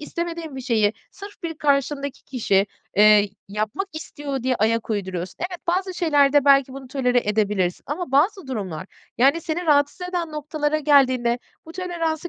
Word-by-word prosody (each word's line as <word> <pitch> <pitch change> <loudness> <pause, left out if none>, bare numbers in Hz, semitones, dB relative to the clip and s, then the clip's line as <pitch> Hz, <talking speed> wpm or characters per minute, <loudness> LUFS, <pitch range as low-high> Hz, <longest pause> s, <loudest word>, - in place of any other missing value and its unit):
istemediğin 335 -1 -5
bir - - -4
şeyi, 220 -4 +2 0.2
sırf 400 0 -12
bir 330 -1 -4
karşındaki 280 -1 0
kişi, 200 -6 +1 0.3
eee, 210 0 +6 0.2
yapmak 215 - -3
istiyor 290 -4 -5
diye 255 0 +1
ayak 225 +2 0
uyduruyorsun. 185 -4 -3
Evet, 360 -1 -4
bazı 370 +2 0
şeylerde 290 -5 +3
belki 275 -2 +5
bunu 265 -1 -9
tolere 250 -2 +1
edebilirsin 205 -4 0
ama 295 -1 -4
bazı 360 +4 +2
durumlar, 190 -9 -5 0.3
yani, 275 +7 +4
seni 335 +2 -3
rahatsız 290 +4 +2
eden 345 -3 -3
noktalara 300 0 -1
geldiğinde 260 -5 +3 0.3
bu 325 - -10
toleransı 340 -2 -3
280 Hz, 150 wpm, -23 LUFS, 230-325 Hz, 0.3 s, eee